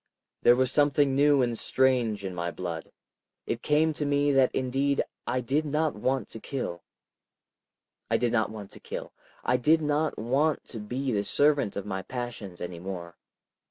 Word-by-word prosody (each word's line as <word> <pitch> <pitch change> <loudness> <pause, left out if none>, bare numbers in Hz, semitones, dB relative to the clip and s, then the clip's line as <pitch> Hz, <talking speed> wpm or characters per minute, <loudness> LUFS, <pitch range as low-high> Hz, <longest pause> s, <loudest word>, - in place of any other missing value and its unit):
There 120 - +7
was 130 0 +2
something 145 -1 +3
new 145 -1 +5
and 120 -1 0
strange 120 -6 +1
in 95 - -4
my 85 -1 -2
blood. 85 -2 -5 0.5
It 115 - -3
came 155 +2 +2
to 150 - -3
me 145 0 +2
that 135 -2 +4
indeed 135 +2 +1 0.2
I 125 - 0
did 140 +6 0
not 155 +1 0
want 130 +2 -1
to 110 - -8
kill. 105 -10 -4 1.3
I 115 - +3
did 120 0 +1
not 110 -2 +2
want 105 -2 -8
to - - -10
kill. - - -7 0.3
I 125 - +2
did 155 +6 +4
not 150 +1 0
want 140 +7 +1
to 115 - -6
be 125 +6 -3
the 100 -3 +1
servant 145 0 +2
of 100 - -4
my 95 -2 -3
passions 115 -6 -6
any 90 -1 -5
more. 85 -2 -6
125 Hz, 175 wpm, -28 LUFS, 105-145 Hz, 1.3 s, There